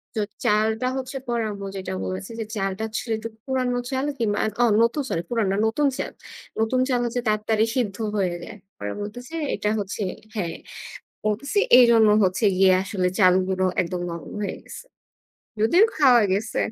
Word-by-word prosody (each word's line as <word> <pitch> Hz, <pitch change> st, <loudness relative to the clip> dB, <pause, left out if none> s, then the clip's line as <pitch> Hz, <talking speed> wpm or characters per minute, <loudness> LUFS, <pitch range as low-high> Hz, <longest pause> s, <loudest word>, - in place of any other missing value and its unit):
তো 215 Hz, -, 0 dB, 0.2 s
চালটা 220 Hz, +3 st, +2 dB
হচ্ছে 260 Hz, +1 st, -5 dB
পরে 235 Hz, -1 st, 0 dB
আম্মু 200 Hz, -1 st, -7 dB
যেটা 190 Hz, -, -5 dB
বলেছে 95 Hz, +1 st, -5 dB
যে 225 Hz, -, -2 dB
চালটা 195 Hz, +1 st, -2 dB
আসলে 225 Hz, +1 st, -3 dB
একটু 225 Hz, +1 st, -6 dB, 0.2 s
পুরানো 255 Hz, -2 st, 0 dB
চাল 265 Hz, +1 st, -1 dB
কিংবা, 215 Hz, -4 st, 0 dB
আ -, -, +1 dB, 0.2 s
অ -, -, +6 dB, 0.2 s
নতুন 235 Hz, +6 st, +2 dB
সরি 165 Hz, -, -1 dB
পুরানো 225 Hz, -5 st, 0 dB
না -, -, 0 dB
নতুন 285 Hz, +6 st, +1 dB
চাল। -, -, -3 dB, 0.5 s
নতুন 225 Hz, +3 st, +1 dB
চাল 250 Hz, -2 st, +2 dB
হচ্ছে 240 Hz, +1 st, -2 dB
তাড়াতাড়ি 215 Hz, +1 st, +2 dB
সিদ্ধ 215 Hz, -6 st, 0 dB, 0.2 s
হয়ে 185 Hz, -3 st, 0 dB
যায়। -, -, -9 dB, 0.2 s
পরে 100 Hz, 0 st, -4 dB
বলতেছে 245 Hz, +7 st, -8 dB, 0.2 s
এটা 210 Hz, -, -1 dB
হচ্ছে 205 Hz, +1 st, -3 dB, 0.3 s
হ্যাঁ, 175 Hz, -6 st, -2 dB, 0.7 s
বলতেছি 220 Hz, -, -1 dB, 0.2 s
এইজন্য 235 Hz, -3 st, +6 dB, 0.2 s
হচ্ছে 185 Hz, +4 st, 0 dB
গিয়ে 190 Hz, 0 st, +5 dB
আসলে 190 Hz, -2 st, -1 dB
চালগুলো 185 Hz, 0 st, +3 dB, 0.2 s
একদম 180 Hz, 0 st, -2 dB
নরম 170 Hz, 0 st, -7 dB
হয়ে 205 Hz, -, -2 dB
গেছে। -, -, -10 dB, 0.8 s
যদিও 340 Hz, -, +5 dB
খাওয়া 255 Hz, -6 st, +6 dB
গেছে। 210 Hz, +3 st, -1 dB
215 Hz, 170 wpm, -24 LUFS, 195-240 Hz, 0.8 s, অ